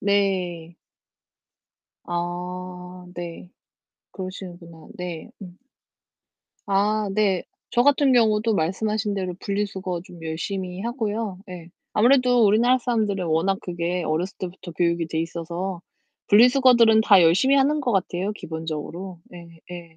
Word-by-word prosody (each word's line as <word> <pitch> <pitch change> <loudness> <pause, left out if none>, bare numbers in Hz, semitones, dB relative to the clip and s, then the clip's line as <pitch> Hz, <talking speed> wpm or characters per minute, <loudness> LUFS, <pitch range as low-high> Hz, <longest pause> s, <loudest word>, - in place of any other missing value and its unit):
네. 185 -4 0 1.3
아, 180 +1 -5
네. 175 0 -8 0.6
그러시는구나. 180 -3 -9
네, 175 -4 -6
음. 180 -1 -11 1.1
아 205 +1 +1
네. 195 -3 +1 0.3
저 240 - +3
같은 280 0 +4
경우도 220 -2 +3
말씀하신 205 +5 -1
대로 185 -2 -3
분리 205 0 -1
수거 185 -3 -5
좀 175 -2 -14
열심히 180 +3 -4
하고요. 220 -4 -3
예. 175 -2 -9 0.2
아무래도 245 0 +4
우리나라 235 +5 +4
사람들은 215 -7 -1
워낙 165 +5 +1
그게 175 0 -2
어렸을 165 +5 -2
때부터 180 -1 -7
교육이 170 0 0
돼 160 - -1
있어서 170 +2 -4 0.5
분리 225 +5 +7
수거들은 245 -4 +5
다 205 -3 +6
열심히 190 +12 +4
하는 285 +3 +3
것 255 -4 -1
같아요, 190 +1 -1
기본적으로. 165 +1 -6
예예. 170 -1 -12
185 Hz, 270 characters per minute, -23 LUFS, 175-215 Hz, 1.3 s, 분리